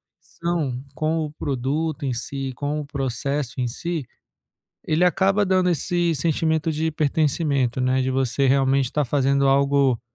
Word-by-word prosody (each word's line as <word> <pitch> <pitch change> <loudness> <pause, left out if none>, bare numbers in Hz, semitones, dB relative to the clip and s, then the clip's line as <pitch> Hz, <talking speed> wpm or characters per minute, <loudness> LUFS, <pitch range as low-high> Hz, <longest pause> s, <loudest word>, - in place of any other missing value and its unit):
condição 155 -7 -3
com 155 0 0
o 150 - -7
produto 145 +3 -2
em 130 - -1
si, 135 +3 -4
com 145 +3 -2
o - - -7
processo 140 -1 -3
em 125 - 0
si, 160 +4 -4 0.8
ele 155 +3 +2
acaba 195 +3 +2
dando 185 -1 +2
esse 175 +1 +1
sentimento 160 +1 0
de 160 +1 -1
pertencimento, 145 -4 0
né, 130 +1 +2
de 130 0 0
você 135 +1 +1
realmente 135 0 +3
estar 145 +4 -1
fazendo 140 +1 +2
algo 140 -2 +3
140 Hz, 150 wpm, -23 LUFS, 135-160 Hz, 0.8 s, realmente